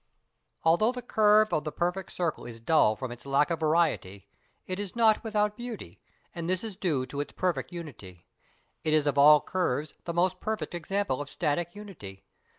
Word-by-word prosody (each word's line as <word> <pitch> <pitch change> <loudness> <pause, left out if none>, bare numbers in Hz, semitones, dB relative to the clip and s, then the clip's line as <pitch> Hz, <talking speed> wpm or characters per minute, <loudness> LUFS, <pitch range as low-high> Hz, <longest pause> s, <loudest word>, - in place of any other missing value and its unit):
Although 175 +9 +4
the 250 -1 -6
curve 215 -2 +4
of 155 - +1
the 155 - -4
perfect 180 +3 -2
circle 170 -3 -2
is 115 -1 -8
dull 115 -3 +3
from 125 +3 -5
its 120 - -9
lack 140 +4 +2
of 165 - -1
variety, 155 - 0 0.4
it 185 +1 -4
is 205 0 -5
not 225 -1 +4
without 210 -2 0
beauty, 240 -1 -8 0.3
and 170 0 -4
this 185 +2 0
is 220 -4 -6
due 160 -10 -1
to 140 - -7
its 145 - -4
perfect 175 -5 -1
unity. 110 - -10 0.6
It 155 0 +2
is 150 -1 +2
of 145 -1 +1
all 150 +1 +8
curves 155 -5 -1
the 170 - -3
most 180 +1 +1
perfect 215 -3 -3
example 175 -4 -2
of 145 - -6
static 170 +6 -1
unity. 160 - -10
170 Hz, 185 wpm, -28 LUFS, 145-200 Hz, 0.6 s, all